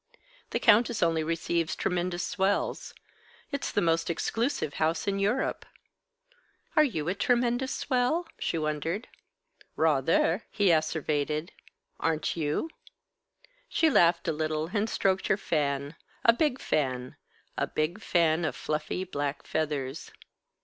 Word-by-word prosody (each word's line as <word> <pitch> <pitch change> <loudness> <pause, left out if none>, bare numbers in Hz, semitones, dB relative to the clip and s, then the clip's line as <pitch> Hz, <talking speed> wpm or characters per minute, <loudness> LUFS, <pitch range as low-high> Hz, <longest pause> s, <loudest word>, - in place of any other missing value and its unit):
"The - - -1
Countess 225 0 +4
only 165 -1 +2
receives 165 0 -1
tremendous 180 0 -1
swells. 195 +1 -1 0.6
It's 280 -1 -2
the 205 - +1
most 165 0 +1
exclusive 225 - -1
house 160 +3 +1
in 195 0 0
Europe." 210 +7 0 1.1
"Are 305 - +7
you 165 - -1
a 180 - +1
tremendous 245 +4 +1
swell?" 265 +6 0
she - - -1
wondered. 155 - -2 0.7
"Rather!" 160 - +2
he 205 -4 +3
asseverated. 155 0 0 0.5
"Aren't 160 -1 0
you?" 160 - -1 1.0
She 320 -1 +3
laughed 170 -7 +4
a 165 - +2
little, 155 +1 -2
and 215 +1 +1
stroked 190 -2 +1
her 195 - +3
fan, 140 -5 -1 0.3
a 230 - +8
big 270 0 +1
fan, 130 -4 -1 0.4
a - - 0
big 170 +7 -2
fan 170 -3 +2
of 160 - -1
fluffy 155 +4 -2
black 145 -5 -3
feathers. 150 -2 -2
170 Hz, 125 wpm, -28 LUFS, 155-205 Hz, 1.1 s, a